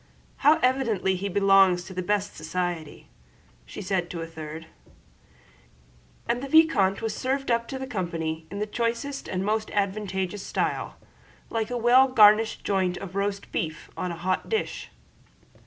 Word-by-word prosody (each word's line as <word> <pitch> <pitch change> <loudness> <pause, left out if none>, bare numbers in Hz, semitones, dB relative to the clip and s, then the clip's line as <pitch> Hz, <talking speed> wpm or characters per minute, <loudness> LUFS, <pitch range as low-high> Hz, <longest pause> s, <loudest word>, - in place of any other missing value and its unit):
"How 300 +3 +5
evidently 230 -8 +1
he 195 +2 -3
belongs 195 -2 +4
to 190 - -10
the 185 - -3
best 205 +2 -1
society," 165 -1 -4 0.6
said 190 -2 -2
she - - -20
to 170 - -5
a - - -3
third; 160 0 -8 1.6
and 240 +1 0
the 275 - -4
vicomte 265 -12 +4
was 225 - -2
served 270 0 -1
up 235 0 +1
to 270 - -5
the 265 - -5
company 165 -8 -3
in 200 - -6
the 210 - -1
choicest 235 +5 -3
and 185 +1 -2
most 215 +1 0
advantageous 195 -1 -1
style, - - -2 0.6
like 225 -1 -1
a 245 - -2
well 245 +3 +5
garnished 220 -3 +5
joint 185 -2 0
of 195 -1 -8
roast 200 0 -2
beef 160 -1 -4
on 180 - -3
a - - -5
hot 185 +2 -2
dish. 440 - -2
200 Hz, 155 wpm, -26 LUFS, 180-235 Hz, 1.6 s, How